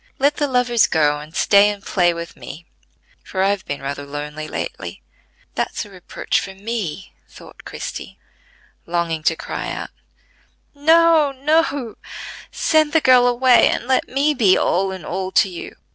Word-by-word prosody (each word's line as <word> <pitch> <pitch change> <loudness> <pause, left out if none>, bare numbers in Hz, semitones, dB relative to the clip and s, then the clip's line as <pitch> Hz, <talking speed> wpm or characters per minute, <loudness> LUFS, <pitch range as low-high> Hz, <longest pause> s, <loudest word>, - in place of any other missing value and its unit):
Let 285 +2 +2
the 290 - 0
lovers 250 -3 +2
go, 150 -2 +1
and 155 +3 -12
stay 200 +1 +5
and 205 -1 -6
play 175 -2 +2
with 170 0 -7
me, 170 +3 -10 0.6
for 190 -1 -2
I've 200 0 0
been 140 -1 -5
rather 140 +1 -4
lonely 150 +2 -6
lately." - - -6 0.5
"That's - - -3
a 205 - -15
reproach 185 -2 -2
for 195 -1 -7
me," 195 -4 -5 0.2
thought - - -15
Christie, - - -7 0.7
longing 170 -2 -1
to 165 +1 +1
cry - - -5
out: - - -6 0.8
"No, 320 0 +4
no; 280 -3 0 0.5
send 310 -2 +2
the 320 - +5
girl 250 -2 +5
away 245 0 +5
and - - -2
let 260 -1 +1
me 280 +3 +1
be 215 -9 +4
all 190 +1 +1
in 185 -4 -8
all 185 +2 -4
to - - +4
you." 175 - -8
200 Hz, 160 wpm, -20 LUFS, 170-265 Hz, 0.8 s, stay